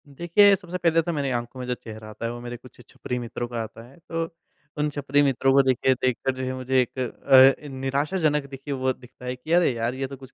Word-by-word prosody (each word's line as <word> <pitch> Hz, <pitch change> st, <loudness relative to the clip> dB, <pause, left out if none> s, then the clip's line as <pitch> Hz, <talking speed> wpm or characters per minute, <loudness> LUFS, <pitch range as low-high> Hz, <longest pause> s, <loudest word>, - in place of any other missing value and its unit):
देखिए, 175 Hz, +8 st, +4 dB
सबसे 180 Hz, -2 st, -6 dB
पहले 165 Hz, -2 st, +3 dB
तो 170 Hz, -, -3 dB
मेरी 140 Hz, -3 st, -1 dB
आँखों 120 Hz, +1 st, -4 dB
में 125 Hz, -, -4 dB
जो 125 Hz, -, 0 dB
चेहरा 110 Hz, -2 st, -10 dB
आता 110 Hz, +2 st, -7 dB
है 115 Hz, -, -1 dB
वो 120 Hz, -, -7 dB
मेरे 120 Hz, 0 st, -6 dB
कुछ 125 Hz, +1 st, -17 dB
छपरी 125 Hz, -, -5 dB
मित्रों 120 Hz, 0 st, -5 dB
का 120 Hz, -1 st, -4 dB
आता 115 Hz, +1 st, -10 dB
है, 135 Hz, -, -19 dB
तो 165 Hz, 0 st, -1 dB, 0.5 s
उन 150 Hz, 0 st, +1 dB
छपरी 145 Hz, 0 st, +1 dB
मित्रों 135 Hz, -1 st, +2 dB
को 140 Hz, -, +7 dB
देखिए, 130 Hz, 0 st, +2 dB
देखकर 130 Hz, 0 st, 0 dB
जो 130 Hz, -, -5 dB
है 130 Hz, 0 st, -2 dB
मुझे 130 Hz, 0 st, +1 dB
एक 125 Hz, +1 st, -4 dB, 0.6 s
अ, 150 Hz, -, -10 dB
निराशाजनक 145 Hz, +3 st, 0 dB
देखिए 135 Hz, +1 st, -6 dB
वो 130 Hz, -1 st, 0 dB
दिखता 125 Hz, 0 st, -15 dB
है 125 Hz, 0 st, -3 dB
कि, 130 Hz, +6 st, -9 dB
अरे 175 Hz, -4 st, +4 dB
यार 115 Hz, +1 st, -2 dB
ये 135 Hz, 0 st, -3 dB
तो 135 Hz, 0 st, -9 dB
कुछ 130 Hz, 0 st, -14 dB
130 Hz, 245 wpm, -25 LUFS, 125-145 Hz, 0.6 s, को